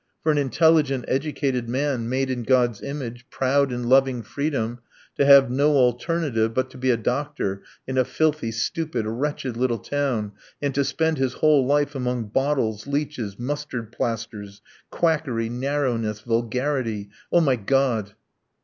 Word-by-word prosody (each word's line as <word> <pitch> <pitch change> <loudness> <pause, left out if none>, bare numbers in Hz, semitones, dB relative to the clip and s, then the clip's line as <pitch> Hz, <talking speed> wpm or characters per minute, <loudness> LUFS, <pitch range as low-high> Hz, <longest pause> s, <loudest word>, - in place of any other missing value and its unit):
For 155 - +3
an 150 - +2
intelligent, 145 -2 +3
educated 135 -3 -1
man, 130 -2 -1
made 130 +1 0
in 125 -1 -2
God's 120 -2 +2
image, 130 -3 -6
proud 135 +1 +1
and 125 0 -3
loving 130 -2 +3
freedom, 120 -2 -2 0.4
to 140 - +2
have 140 -3 +8
no 145 +4 +3
alternative 125 -2 +1
but 130 0 0
to 130 - -12
be 130 0 0
a 120 - +4
doctor 125 -5 -2 0.2
in 130 0 -1
a - - +5
filthy, 150 -2 0
stupid, 120 +1 -2
wretched 130 +2 -3
little 120 -1 0
town, 125 -4 -2 0.3
and 140 -1 -1
to 140 +2 +2
spend 160 +2 0
his 130 -2 0
whole 150 -4 +3
life 145 0 +2
among 125 -4 -2
bottles, 125 -3 0
leeches, 140 -8 -3
mustard 125 -3 -4
plasters! 110 -4 -4 0.3
Quackery, 145 -9 0
narrowness, 120 -4 -1
vulgarity! 115 -2 -1 0.2
Oh, 175 - +5
my 135 -5 +3
God!" 115 -3 0
130 Hz, 150 wpm, -24 LUFS, 115-145 Hz, 0.4 s, have